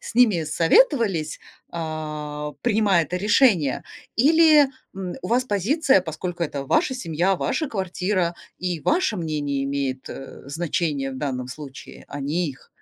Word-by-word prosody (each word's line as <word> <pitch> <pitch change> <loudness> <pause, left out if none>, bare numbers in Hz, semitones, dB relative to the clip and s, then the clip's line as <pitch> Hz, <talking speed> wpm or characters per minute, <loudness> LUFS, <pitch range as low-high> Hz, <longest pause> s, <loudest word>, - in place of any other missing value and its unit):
с - - -8
ними 215 -9 +4
советовались, 170 - +2 0.3
а, 150 -2 -5
принимая 205 -7 +3
это 180 - -4
решение, 195 - +3 0.3
или, 305 +2 +6 0.3
м, 185 -2 -5
у - - -4
вас 250 +2 +2
позиция: 255 - +2
поскольку 175 +1 -4
это 140 -3 -3
ваша 260 - +2
семья, 180 -4 0
ваша 310 - -1
квартира 185 -2 -1 0.2
и 180 -3 -2
ваше 320 - +1
мнение 145 -4 -2
имеет, 135 -2 -2
э, 135 - -9
значение 150 -3 -1
в - - -7
данном 130 -3 -3
случае, 140 0 -10
а 145 - -6
не 155 +4 -1
их? 135 - -15
170 Hz, 140 wpm, -23 LUFS, 150-210 Hz, 0.3 s, или